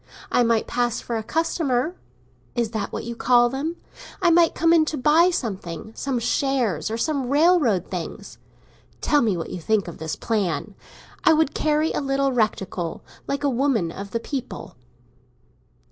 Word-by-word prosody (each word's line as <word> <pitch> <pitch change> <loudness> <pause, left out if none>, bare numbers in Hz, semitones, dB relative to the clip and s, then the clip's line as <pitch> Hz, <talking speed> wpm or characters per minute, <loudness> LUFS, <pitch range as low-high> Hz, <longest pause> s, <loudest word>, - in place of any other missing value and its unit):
I - - +3
might 230 -2 +2
pass 240 -1 -1
for 235 - -4
a 225 - -1
customer—is 275 -4 -3
that 220 -2 -3
what - - -4
you 235 +1 -5
call 240 0 +4
them? 285 +6 -3 0.4
I 355 -4 +4
might 335 -1 +4
come 330 +1 +3
in 325 -2 +6
to 310 - -3
buy 310 +7 +5
something—some 220 - -4
shares 240 - 0
or 225 - -2
some 275 -1 -1
railroad 290 - +3
things. 180 -3 -6 0.6
Tell 295 -1 +3
me 210 -6 +1
what 165 - -5
you 180 - -5
think 210 +2 +1
of 170 - -8
this 160 0 -3
plan. 205 -2 -2 0.5
I 330 - +6
would 310 -2 +2
carry 305 +1 +1
a - - -1
little 275 0 +1
reticule, 195 -7 -1 0.2
like 280 +1 -2
a - - +3
woman 250 -9 +1
of 200 +3 -7
the 230 - -2
people." 250 - -6
245 Hz, 160 wpm, -23 LUFS, 215-300 Hz, 0.6 s, in